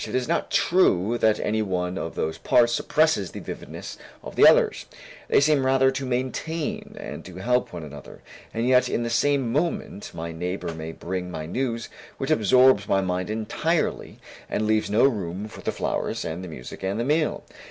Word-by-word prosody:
It - - -4
is 130 -1 0
not 170 - 0
true 120 - +3
that 110 -1 +3
any 110 +1 0
one 90 -3 -2
of 85 -3 -4
those 80 +1 -2
parts 120 -1 +4
suppresses 155 - +2
the - - -8
vividness - - -8 0.2
of - - -8
the - - +8
others, - - +4 0.4
they - - +4
seem 145 -1 +3
rather 135 0 +4
to 135 0 -4
maintain 130 +6 -3
and - - -7
to 90 - -11
help 125 +7 0
one 85 -2 -7
another; 75 -1 -11 0.3
and 115 +2 -1
yet 125 -1 +4
in 120 - -1
the 115 - -2
next - - +2
moment, 140 - -1
my 85 0 -5
neighbor 90 +1 -4
may 80 0 -6
bring 90 +2 -5
me 80 -2 -5
news 115 +5 -2 0.3
which - - -2
absorbs 120 0 +5
my 95 - +2
mind 90 0 -2
entirely 130 +10 -1 0.3
and 110 - -1
leaves 110 0 +1
no 105 +3 +3
room 100 -6 0
for - - -11
the - - -1
flowers - - -2
and 85 +3 -4
the - - -6
music 65 -7 -9
and 95 +3 -2
the 120 - 0
meal. 150 +3 +1
110 Hz, 190 wpm, -25 LUFS, 90-130 Hz, 0.4 s, the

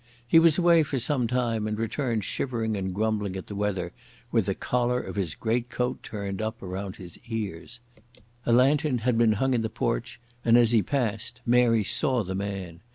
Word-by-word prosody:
He 165 - +7
was 165 -2 +5
away 170 -2 +5
for 140 -2 -2
some 130 -1 0
time 115 -3 0
and 105 0 -2
returned 115 0 -1
shivering 115 -1 -2
and 95 -1 -2
grumbling 105 -1 -1
at 95 - -5
the - - -8
weather, 100 -4 -2 0.4
with - - +2
the - - 0
collar 125 0 0
of - - -6
his 95 -6 -2
greatcoat 125 +2 -1
turned 100 -1 -5
up 110 0 -4
around 95 +1 -5
his 90 -3 -11
ears. 110 0 -5 0.7
A - - +3
lantern 135 +3 +4
had 125 -2 +3
been 115 -1 +4
hung 130 +5 +1
in 120 - +1
the 110 - -2
porch - - -2 0.2
and 115 0 +5
as 120 -1 +5
he 115 -2 +4
passed 120 0 -2
Mary 120 -2 +4
saw 125 +4 +1
the 95 0 -4
man. 95 -3 -5
115 Hz, 190 wpm, -27 LUFS, 100-125 Hz, 0.7 s, He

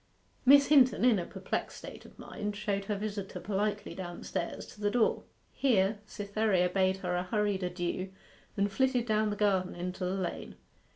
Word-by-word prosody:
Miss 280 +1 +8
Hinton, 260 -5 +5
in 235 -6 +5
a 175 - -4
perplexed - - -4
state - - -10
of - - -16
mind, 210 0 -5
showed 200 -1 -2
her 210 - -1
visitor 200 -1 -4
politely 205 +1 -2
downstairs 175 -1 -5
to 210 - -15
the 205 - +2
door. 235 +1 +1 0.3
Here 210 -6 +2
Cytherea 200 -3 0
bade 190 0 +2
her 180 - 0
a 180 - +1
hurried 205 +1 0
adieu, 180 +1 -3 0.5
and 200 0 +1
flitted 255 +2 +1
down 215 -1 +1
the 205 - -2
garden 195 -3 +1
into 180 +2 -4
the 180 +1 -1
lane. 185 -3 -4
200 Hz, 170 wpm, -31 LUFS, 185-215 Hz, 0.5 s, Miss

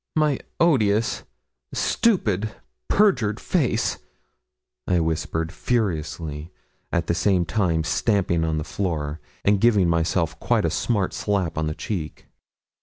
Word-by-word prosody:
'My 150 -3 +2 0.2
odious, 110 -10 +2 0.5
stupid, 110 - +1 0.3
perjured 125 - +3
face' 130 -10 0 0.9
I 90 -1 +3
whispered, 80 0 -1
furiously, 80 -8 -2 0.4
at 85 -1 0
the 85 - 0
same 90 +1 +2
time 85 -2 +1
stamping 85 +1 +1
on 80 -1 0
the 75 - -2
floor, 80 -5 -3 0.3
and 100 -1 +3
giving 105 -6 +4
myself 85 -1 0
quite - - +1
a - - +1
smart 105 -6 0
slap 95 -6 -1
on 80 0 -1
the 75 - -3
cheek. 85 -8 -5
90 Hz, 120 wpm, -24 LUFS, 80-110 Hz, 0.9 s, giving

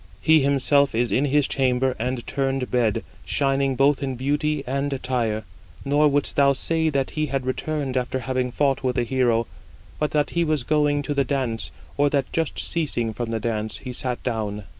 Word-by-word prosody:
He 160 0 +5
himself 140 0 +3
is 120 +1 +1
in 140 - +2
his 145 0 +2
chamber 130 -1 +1
and 125 +1 -2
turned 135 -2 -1
bed, 120 -4 +1 0.2
shining 135 -1 +1
both 140 +2 +3
in 135 -2 -2
beauty 145 +3 0
and 140 +2 -1
attire; 125 -5 -1 0.4
nor 145 +2 +4
wouldst 145 0 0
thou 140 -1 +5
say 160 +3 0
that 140 -3 -1
he 155 0 -1
had 135 -1 -2
returned 135 +1 -2
after 130 +1 -1
having 130 0 -1
fought 135 +1 +1
with 125 -1 0
a 120 - +2
hero, 120 -2 +1 0.5
but 150 - +1
that 150 -1 0
he 170 - +1
was 155 -5 0
going 145 0 +2
to 145 - -2
the 140 -1 +2
dance, 125 -5 -2 0.3
or 145 0 +4
that 140 -2 -1
just 165 -2 -1
ceasing 120 -9 -1
from 120 +1 -4
the 115 -1 -1
dance, 110 -1 -2
he 125 -2 -7
sat 125 0 -3
down." 105 -4 -2
135 Hz, 190 wpm, -24 LUFS, 125-145 Hz, 0.5 s, He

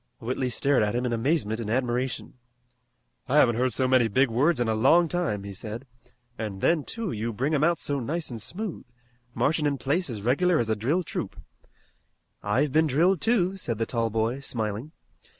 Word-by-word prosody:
Whitley 125 +2 -2
stared 140 +2 +2
at 105 +1 0
him 125 +1 0
in 120 - -1
amazement 115 -2 0
and 110 -3 -4
admiration. 125 +1 -1 1.0
"I 140 - +3
haven't 120 -6 +5
heard 130 +1 +1
so 130 +3 +1
many 130 -2 +4
big 130 +3 +2
words 145 +8 +2
in 120 - +1
a 110 - +1
long 140 +10 +4
time," 155 - -1
he 100 0 -7
said, 110 +6 -7 0.5
"an' 105 -3 -4
then, 155 - +2
too, 225 0 -4
you 110 +2 -3
bring 130 +8 -1
'em 150 -1 +2
out 170 +1 +3
so 140 -1 -1
nice 155 +5 -2
an' 115 - -5
smooth, 190 - -4 0.5
marchin' 150 0 +1
in 140 -1 -1
place 145 +6 0
as 105 -4 -6
regular 165 +9 +2
as 115 -4 0
a - - +2
drilled 145 - 0
troop." - - -5 1.0
"I've 130 +8 +1
been 160 +3 +3
drilled 170 +6 +2
too," 195 -5 +1
said 120 - -3
the 115 - 0
tall 115 -1 -1
boy, 115 +4 -1
smiling. 115 +1 -3
130 Hz, 195 wpm, -26 LUFS, 115-155 Hz, 1.0 s, haven't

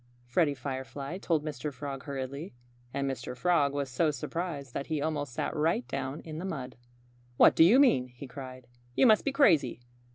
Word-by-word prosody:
Freddie 145 +4 +2
Firefly 135 +5 -5
told 160 -5 0
Mr. 150 -1 -4
Frog 140 0 -6
hurriedly. 140 +2 -5 0.4
And 140 +1 -2
Mr. 125 -1 -4
Frog 155 -2 +3
was 140 -1 -2
so 135 +6 +1
surprised 150 -1 -4
that 140 - -4
he 155 -2 -1
almost 145 -2 -2
sat - - -3
right 165 +10 +1
down 135 +3 -4
in 155 -1 -7
the - - -5
mud. 135 -9 -5 0.6
"What - - +7
do - - +7
you 200 +10 +7
mean?" 235 - +4
he 125 +2 -11
cried. 130 -1 -9 0.3
"You - - +5
must 220 -3 +6
be 280 - 0
crazy! 160 - +3
140 Hz, 185 wpm, -30 LUFS, 130-165 Hz, 0.6 s, What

